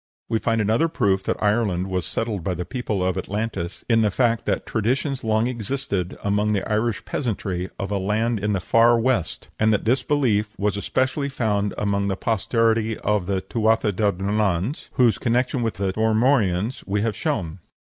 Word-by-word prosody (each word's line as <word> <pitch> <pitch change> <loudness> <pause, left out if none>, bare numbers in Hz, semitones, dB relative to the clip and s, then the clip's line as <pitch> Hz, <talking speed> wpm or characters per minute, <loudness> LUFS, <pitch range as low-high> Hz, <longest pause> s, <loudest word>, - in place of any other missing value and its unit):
We 115 -1 +1
find 115 +1 0
another 110 +9 +2
proof 100 -11 +1
that - - -2
Ireland 105 -4 +1
was 95 -2 -2
settled 110 -6 -2
by 90 +1 -1
the 90 +1 -4
people 110 -6 -2
of 95 -1 0
Atlantis 100 -4 -4
in 115 -2 +4
the 105 - +3
fact 115 +2 +1
that - - 0
traditions 130 +5 -1
long 110 0 +2
existed 115 -6 -2
among 105 +1 +1
the 100 - -1
Irish 110 0 -1
peasantry 95 -7 -3
of 100 +1 -4
a 100 - 0
land 110 +4 0
in 105 +1 0
the 95 - 0
"Far 115 +5 +4
West," 115 -9 -1
and 110 0 +4
that 105 - 0
this 125 +3 +3
belief 115 -8 0
was 105 0 0
especially 130 +7 -1
found 105 -6 -1
among 100 -1 0
the 95 -1 -1
posterity 115 +1 +1
of 105 -4 0
the 95 -1 0
Tuatha 110 +2 +1
de 100 +1 +1
Dananns, 100 - -1
whose 120 -3 +3
connection 125 +2 +1
with 115 -2 -1
the 95 0 -1
Formorians 110 -1 +1
we 100 +1 0
have 110 -3 -1
shown. 85 0 -2
110 Hz, 180 wpm, -23 LUFS, 100-115 Hz, -, in